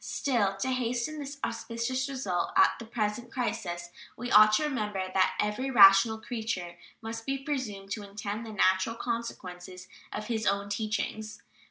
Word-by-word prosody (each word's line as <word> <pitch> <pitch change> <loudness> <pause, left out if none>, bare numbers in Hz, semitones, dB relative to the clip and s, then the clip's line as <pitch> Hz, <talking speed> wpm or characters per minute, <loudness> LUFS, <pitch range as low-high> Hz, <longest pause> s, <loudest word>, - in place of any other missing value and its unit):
Still, 210 -8 0
to 225 +7 -1
hasten 250 +4 -1
this 285 0 -6
auspicious 235 +3 -2
result 230 -10 -2
at - - +7
the 230 - -7
present 225 +1 -3
crisis 175 -8 -3 0.3
we 245 +1 -5
ought 215 0 +8
to 215 - +3
remember 210 -9 -1
that 190 -1 +3
every 210 +6 0
rational 205 -1 +7
creature 220 -7 -4 0.3
must 225 0 -5
be 275 0 0
presumed 255 -9 -4
to 210 - -3
intend 205 +2 -4
the 225 - -7
natural 190 +2 +2
consequences 185 -6 -5 0.2
of 210 - -4
his 220 -1 -2
own 200 +1 0
teachings. 215 0 -3
220 Hz, 155 wpm, -29 LUFS, 200-245 Hz, 0.3 s, ought